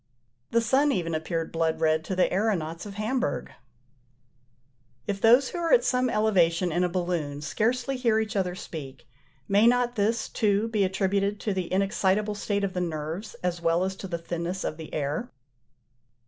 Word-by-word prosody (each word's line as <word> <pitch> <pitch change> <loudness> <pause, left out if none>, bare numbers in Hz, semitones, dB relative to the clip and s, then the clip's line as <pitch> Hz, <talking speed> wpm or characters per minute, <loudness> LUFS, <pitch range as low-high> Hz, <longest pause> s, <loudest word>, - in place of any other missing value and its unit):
The 230 - +2
sun 270 +6 +3
even 170 -9 -1
appeared 160 +1 -2
blood 165 -1 0
red 160 0 +2
to 190 - -3
the 180 - +3
aëronauts 180 -4 -1
of 200 - -9
Hamburgh. 215 - -2 1.5
If 200 -1 -3
those 245 +4 +6
who 350 - -5
are 335 -1 0
at - - +6
some 255 0 +1
elevation 180 -6 +2
in 175 +3 +1
a 180 - +1
balloon 170 -5 -2
scarcely 245 - 0
hear 230 -3 +2
each 220 0 -3
other 180 -2 0
speak, 140 -9 -8 0.4
may 205 +3 +5
not 245 0 +2
this, 220 +3 +1
too, 210 0 +1
be 215 -3 +1
attributed 195 +2 0
to 210 - -1
the 185 -2 -3
inexcitable 195 +2 +1
state 205 0 -1
of 195 -2 -1
the 180 - -1
nerves 165 +4 -4
as 175 -1 -1
well 165 +1 +2
as 190 0 -2
to 195 - -6
the 170 -2 -3
thinness 170 +2 -4
of 155 - -3
the 160 -2 -9
air? 150 +10 -2
190 Hz, 175 wpm, -27 LUFS, 170-220 Hz, 1.5 s, those